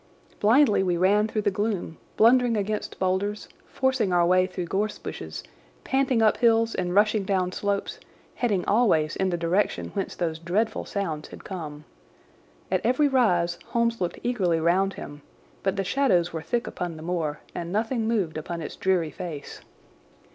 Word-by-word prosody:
Blindly 225 0 +4
we 180 -2 +1
ran 205 +4 +3
through 215 -1 -2
the 205 - +2
gloom, 200 -5 -2 0.2
blundering 240 0 +5
against 210 +1 -3
boulders, 195 +3 -1 0.2
forcing 260 -7 0
our 175 -1 +4
way 185 +1 +4
through 180 -1 -5
gorse 205 +5 -1
bushes, 80 -1 -7 0.4
panting 265 -4 +2
up 215 - +4
hills 230 -1 +3
and 180 0 -2
rushing 210 0 +3
down 185 -2 0
slopes, 200 +1 -2 0.3
heading 210 -8 0
always 190 -9 +2
in 190 -1 0
the 175 - -1
direction 170 +5 0
whence 195 -2 -3
those 165 -2 -2
dreadful 205 +7 -1
sounds 165 -7 -3
had - - -12
come. 155 -6 -7 0.9
At 185 -1 +2
every 255 +5 +3
rise 180 -10 +2
Holmes 235 -2 0
looked 175 -1 -2
eagerly 185 -9 +1
round 185 +4 +2
him, 145 0 -9 0.4
but 195 0 0
the 195 - -1
shadows 180 -6 +2
were 160 - -3
thick 235 +10 -1
upon 175 -3 -5
the 155 - -9
moor, 165 -4 -2
and 170 0 -5
nothing 225 +2 0
moved 190 -9 0
upon 170 +2 -5
its 160 - -6
dreary 180 -5 +1
face. 150 -1 -7
190 Hz, 165 wpm, -26 LUFS, 170-220 Hz, 0.9 s, blundering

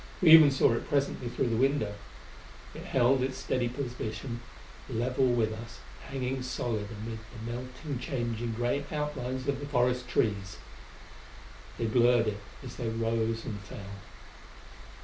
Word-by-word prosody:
We 170 -4 +6
even 160 -2 +11
saw 135 -3 +4
it 115 - -3
presently 140 -3 0
through 120 0 0
the 115 - +1
window. 130 -5 +2 0.8
It - - -8
held 130 +1 +3
its 130 0 -1
steady 125 -2 0
position, 120 -2 -4 0.5
level 125 +2 +1
with 115 -3 +2
us, 115 +2 -8 0.3
hanging 130 -1 -2
solid 120 -4 -2
amid 110 +1 -6
the 115 0 -7
melting, 130 +3 -5
changing 120 -5 -2
gray 120 +5 0
outlines 135 -4 -3
of 140 -1 0
the 145 - -5
forest 125 -2 +1
trees. 100 -5 0 1.2
They 115 - -1
blurred 120 +1 +4
it 100 -1 -5 0.2
as 125 -2 -8
they 120 -3 -2
rose 115 0 -1
and 105 -4 -4
fell. 100 0 -9
120 Hz, 145 wpm, -30 LUFS, 115-130 Hz, 1.2 s, even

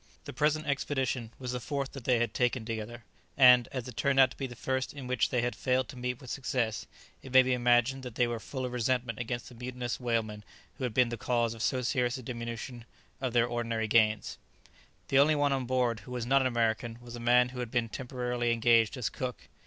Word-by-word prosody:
The - - -7
present 155 +3 +1
expedition 135 -4 -1
was 125 -2 -5
the 125 - -3
fourth 140 +2 -3
that 135 -4 -9
they 125 -2 +3
had 120 -2 0
taken 125 -1 0
together; 115 +1 -5 0.3
and, 125 -2 +7
as 130 -2 -4
it 125 - -8
turned 140 -1 +2
out 130 -1 +6
to - - -11
be 135 - -3
the 125 - -10
first 130 +3 -2
in 140 -2 -7
which 125 -1 +1
they 125 - +1
had 120 -2 -1
failed 130 0 0
to 140 - -9
meet 125 0 -3
with 130 -3 -9
success, 125 -4 -2 0.3
it 130 - -11
may 130 0 +8
be 130 0 +1
imagined 120 +2 +3
that 125 -3 -8
they 125 - +3
were 120 -1 -3
full 130 +2 -5
of 125 - -4
resentment 125 -1 -1
against 120 0 -4
the - - -13
mutinous 125 0 -5
whalemen 115 -4 -2 0.4
who 130 - -1
had 120 - -4
been 125 -2 +4
the 120 - -4
cause 120 0 0
of 115 - -9
so 130 +1 0
serious 125 0 0
a 130 - -9
diminution 115 0 -6 0.4
of 130 -3 -2
their 120 -1 +4
ordinary 115 -2 -2
gains. 110 -2 +2
[Illustration: - - -36
Negoro.] - - -30
The 135 - +4
only 150 +2 +5
one 145 -1 +2
on 130 -2 -1
board 125 -3 +1
who 125 - -12
was 125 -2 -3
not 135 +2 +4
an 130 - +2
American 115 -1 0
was 120 0 -10
a - - -7
man 125 +1 +4
who 125 0 -8
had 120 -2 -3
been 120 0 0
temporarily 125 0 -2
engaged 115 0 +3
as 125 - -1
cook. 125 -2 -5
125 Hz, 240 wpm, -30 LUFS, 115-130 Hz, 0.4 s, may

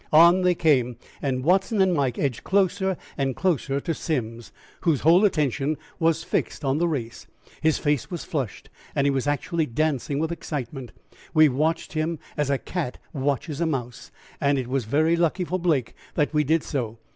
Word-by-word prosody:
On 170 +4 +7
they 180 -1 +3
came, 130 -8 +2 0.2
and 130 -2 -1
Watson 190 - +2
and 190 -1 +4
Mike 135 -6 0
edged 135 -6 -1
closer 190 -1 +1 0.2
and 135 -2 0
closer 140 -6 0
to 165 - -1
Simms, 120 -8 -3 0.3
whose 160 -6 +1
whole 170 +6 +5
attention 150 - +1 0.2
was 165 -1 +2
fixed 150 - -2
on 135 +2 +1
the 175 - +2
race. 115 -8 -4 0.3
His 160 -1 +3
face 145 -4 0
was 175 -3 -5
flushed, 135 - -4 0.2
and 140 - +2
he 140 - +4
was 135 0 -1
actually 150 +3 0
dancing 140 +1 -1
with 160 +2 -1
excitement. 135 -6 -5 0.4
We 155 -1 +7
watched 155 +5 -1
him 160 +1 -1 0.2
as 145 -2 0
a 140 - +2
cat 160 -3 -4 0.2
watches 140 +2 -2
a 170 - +2
mouse, 125 -6 -4 0.3
and 140 0 +3
it 130 -2 -2
was 130 -3 -1
very 155 +8 +2
lucky 170 +2 +1
for 180 +1 -2
Blake 155 -9 +1 0.2
that 150 +1 +1
we 150 0 +3
did 160 +2 +2
so. 115 -5 -3
150 Hz, 180 wpm, -25 LUFS, 135-165 Hz, 0.4 s, On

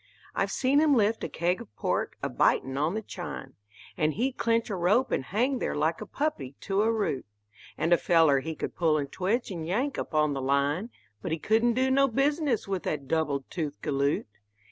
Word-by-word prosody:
I've - - 0
seen 270 +2 +2
him 300 -2 +4
lift 220 -1 +2
a - - -2
keg 175 +2 0
of 105 - -13
pork, - - -1
a - - +1
bitin' 130 0 +2
on 155 +7 0
the 220 - -3
chine, 155 -9 -7 0.4
And 155 -1 0
he'd 255 +4 0
clench 230 -1 +1
a - - -1
rope 205 +9 +2
and 130 - 0
hang 250 - 0
there - - -2
like 155 +3 0
a - - -6
puppy 145 - -3
to 195 +1 0
a 225 +1 +3
root; 205 - -1 0.5
And 165 +2 +2
a - - +6
feller 160 -5 +4
he 160 +4 -5
could - - -5
pull 160 -3 +2
and 140 -2 -3
twitch 205 +5 -1
and 165 -3 -5
yank 250 +10 -1
up - - -5
on 150 -1 +3
the 135 - -3
line, 140 - +1 0.3
But - - -4
he - - 0
couldn't 225 +7 +2
do 260 +1 +2
no 275 +1 +4
business 275 -1 +1
with 190 -2 -2
that 140 -3 -3
double 155 -3 0
toothed 155 -5 -4
galoot. 140 0 0
180 Hz, 210 wpm, -28 LUFS, 150-235 Hz, 0.5 s, a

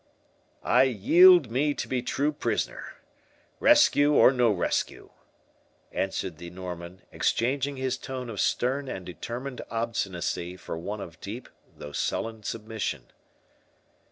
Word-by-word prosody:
"I 125 - +4
yield 160 - +6
me 145 +4 +1
to - - -4
be 130 -1 -1
true 140 +4 0
prisoner, 145 - -3 0.6
rescue 150 - +5
or 135 - +7
no 125 -3 +3
rescue," 90 -4 -2 0.8
answered 95 -3 -3
the 85 0 -8
Norman, 90 0 -8
exchanging 135 +3 0
his 130 0 -2
tone 130 -2 -6
of 110 -4 -6
stern 135 +3 0
and 95 -8 -6
determined 120 - -6
obstinacy 95 -6 -3
for 90 - -6
one 100 +6 -5
of 85 -4 -10
deep 115 +6 -7 0.3
though 75 - -8
sullen 110 +9 -2
submission. 110 0 -4
115 Hz, 125 wpm, -27 LUFS, 95-130 Hz, 0.8 s, or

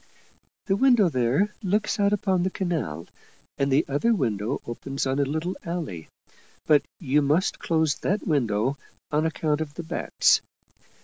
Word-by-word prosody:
" - - -43
The 195 - +1
window 240 -5 +4
there 135 - +1
looks 210 +2 0
out 200 0 +3
upon 195 -3 +1
the 185 - +1
canal, 160 - -3 0.5
and 140 0 +1
the 135 - +3
other 145 +12 +2
window 115 - -1
opens 135 +4 -4
on 135 +1 0
a 140 - +3
little 160 +6 -2
alley. 165 - -5 0.6
But 150 -2 +5 0.2
you 150 -2 +2
must 150 +7 +1
close 160 -3 +1
that 200 +2 -1
window 130 - 0 0.3
on 155 +2 +2
account 155 -1 -1
of 150 -2 -5
the 170 - -5
bats. 160 - +2
155 Hz, 160 wpm, -25 LUFS, 135-185 Hz, 0.6 s, But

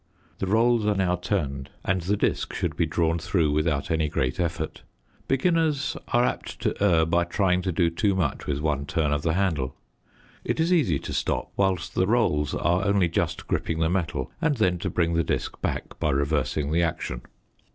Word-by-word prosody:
The 95 - -2
rolls 115 +3 +3
are 105 - +2
now 95 -2 +2
turned 75 -7 -2 0.2
and 95 -1 +1
the 100 +5 0
disc - - -1
should - - -2
be - - +1
drawn 85 0 +1
through 80 -2 +1
without 75 +1 0
any 80 -2 +1
great 65 +1 -1
effort. 85 -2 -2 0.5
Beginners 155 0 +1
are 120 - +3
apt - - -2
to - - +1
err 85 -5 +4
by 85 +1 +2
trying 90 +1 +1
to 90 - -1
do 85 -1 +2
too 100 +3 +1
much 85 -6 -1
with 70 0 -1
one 75 -2 -1
turn 80 -5 0
of 75 - 0
the 80 +1 0
handle. 80 -9 0 0.7
It - - -2
is 165 +3 +3
easy 125 - +3
to - - -6
stop - - -1
whilst 95 -3 0
the 95 - +1
rolls 90 - +1
are 90 +2 +1
only 100 -4 +3
just - - -1
gripping 80 - -1
the 80 0 +1
metal 90 -3 -2
and 150 -3 +2
then 90 -5 +2
to - - -2
bring 85 -1 +1
the 85 0 +2
disc - - -3
back - - -3
by 80 - +1
reversing 70 +1 0
the 85 +2 +2
action. 80 -7 -2
85 Hz, 195 wpm, -25 LUFS, 80-100 Hz, 0.7 s, err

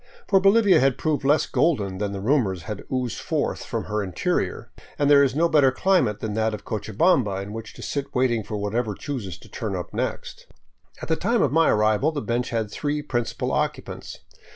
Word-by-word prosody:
For 195 - +5
Bolivia 195 -2 +5
had 135 -1 +2
proved 155 -3 -1
less 145 +3 +3
golden 100 - 0
than 105 -1 -2
the 100 -1 -5
rumors 105 - +1
that - - -15
had - - -11
oozed 130 -2 -2
forth - - -2
from - - -3
her 105 0 -2
interior, 95 -3 -2 0.3
and 145 0 +2
there 140 -1 +8
is 135 -2 +2
no 165 +3 +3
better 145 -5 +4
climate 130 - +1
than 110 -2 -3
that 110 0 0
of 105 - -12
Cochabamba 110 - +1
in 100 +1 -8
which 110 -1 -8
to - - -10
sit 140 -1 -4
waiting 125 -3 +2
for 105 +1 -5
whatever 105 +1 -2
chooses 110 - -5
to - - -16
turn 110 -5 -4
up 90 - -6
next. - - -4 0.6
At - - -4
the 160 - +2
time 225 +6 +1
of 140 - +1
my 165 +2 +4
arrival 110 +7 +2
the 155 - -3
bench 120 -2 -2
had 110 -3 -2
three 145 +4 -2
principal 120 -5 -2
occupants. - - -3
125 Hz, 205 wpm, -24 LUFS, 105-150 Hz, 0.6 s, there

